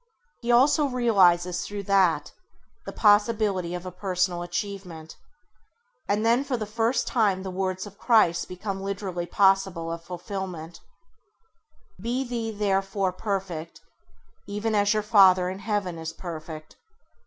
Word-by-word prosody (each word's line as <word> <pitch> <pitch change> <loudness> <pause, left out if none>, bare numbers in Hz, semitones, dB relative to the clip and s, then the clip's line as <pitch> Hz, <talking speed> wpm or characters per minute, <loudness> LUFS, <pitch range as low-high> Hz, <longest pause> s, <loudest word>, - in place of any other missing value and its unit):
He 240 0 0
also 285 +5 +5
realises 185 -9 +3
through 205 -1 -6
that 190 -6 +2 0.6
the - - -4
possibility 205 -4 +2
of 180 +1 -7
a 185 - -5
personal 180 -1 -1
achievement; 175 -3 -6 0.9
and 210 +2 +1
then 235 +4 +3
for 270 -3 -2
the 215 - -3
first 225 +4 0
time 205 -6 +1
the 190 - -5
words 185 0 -2
of 205 0 -13
Christ 215 -8 +3
become 195 +1 -5
literally 195 -3 -4
possible 190 -3 +2
of 165 0 -6
fulfilment: 180 -2 -6 1.2
ŌĆ£Be 245 +3 -2
ye 230 -2 -2
therefore 195 -2 0
perfect, 185 -5 -4 0.7
even 210 +2 -2
as 205 -1 +3
your 215 -1 +1
Father 190 -4 +5
in 190 - -7
Heaven 200 -4 -2
is 160 0 -5
perfect". 155 -2 -8
195 Hz, 130 wpm, -26 LUFS, 180-215 Hz, 1.2 s, also